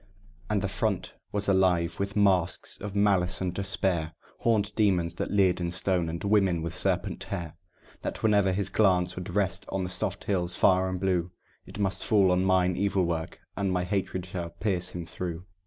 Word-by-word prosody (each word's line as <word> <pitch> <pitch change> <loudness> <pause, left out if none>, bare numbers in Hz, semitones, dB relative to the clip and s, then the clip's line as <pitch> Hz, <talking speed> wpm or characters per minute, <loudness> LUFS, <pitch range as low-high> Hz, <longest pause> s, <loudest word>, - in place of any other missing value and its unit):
And 105 -2 0
the - - +1
front 95 -1 -2 0.2
was 100 0 -1
alive 90 -4 +2
with 100 +1 -2
masks 95 -4 +2
of 100 -1 -6
malice 95 -3 +2
and 95 - -1
of - - -6
despair; 95 -4 -1 0.3
Horned 110 -3 +1
demons 90 -6 +2
that - - -3
leered 95 -3 +2
in 85 - -1
stone, 90 -1 0
and 85 +1 -4
women 100 -5 +2
with 85 0 -4
serpent - - 0
hair; 85 -5 -5 0.5
That - - -5
whenever 105 -3 +4
his 95 +1 -1
glance 90 -4 +2
would 90 0 -6
rest 100 -2 0
on 95 -1 -2
the 90 - -3
soft 90 - -1
hills 90 -3 0
far 95 0 +3
and 90 -1 -3
blue, 90 -2 0 0.4
It - - -9
must 100 -1 -1
fall 100 -4 +4
on 90 +1 +2
mine 90 -1 +3
evil 95 0 +1
work, 80 -1 -4
and 100 -2 -1
my 90 -1 0
hatred 95 -1 -2
should 85 -2 -6
pierce 90 -3 0
him 85 -1 -6
through. 90 0 -5
95 Hz, 190 wpm, -28 LUFS, 90-100 Hz, 0.5 s, whenever